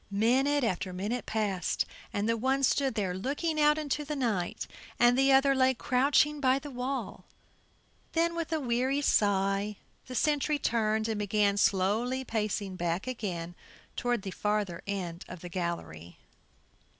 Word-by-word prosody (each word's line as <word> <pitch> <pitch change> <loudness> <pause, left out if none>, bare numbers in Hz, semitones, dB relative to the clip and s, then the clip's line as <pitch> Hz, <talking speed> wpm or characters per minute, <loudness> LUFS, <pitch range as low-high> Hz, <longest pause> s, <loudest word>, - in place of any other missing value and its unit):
Minute 255 +8 +2
after 185 -4 -1
minute 205 +7 -3
passed, 205 -4 0 0.3
and 205 +1 -1
the 230 - +2
one 265 +4 0
stood 270 +1 +2
there 195 -4 -1
looking 295 - -1
out 300 0 +5
into 300 -1 -2
the 300 +1 -4
night 220 -10 -1 0.3
and 240 0 +5
the 270 +1 +4
other 270 +1 +5
lay 260 -1 +3
crouching 285 +5 +2
by 260 -1 +3
the 285 +1 -7
wall; 260 +2 -4 0.9
then 335 +1 +2
with 335 -1 -4
a 320 - +1
weary 260 +2 0
sigh 200 -3 +2 0.3
the 255 - -7
sentry 300 +1 +1
turned 220 -4 0
and 220 -2 -2
began 205 0 +2
slowly 210 +7 +1
pacing 210 -4 -2
back 175 +1 -2
again 180 -9 -4 0.4
toward 245 -4 -1
the 190 - -4
farther 210 -4 -1
end 180 -4 -4
of 180 -2 -9
the 175 - -7
gallery. 165 - -5
230 Hz, 150 wpm, -30 LUFS, 195-270 Hz, 0.9 s, out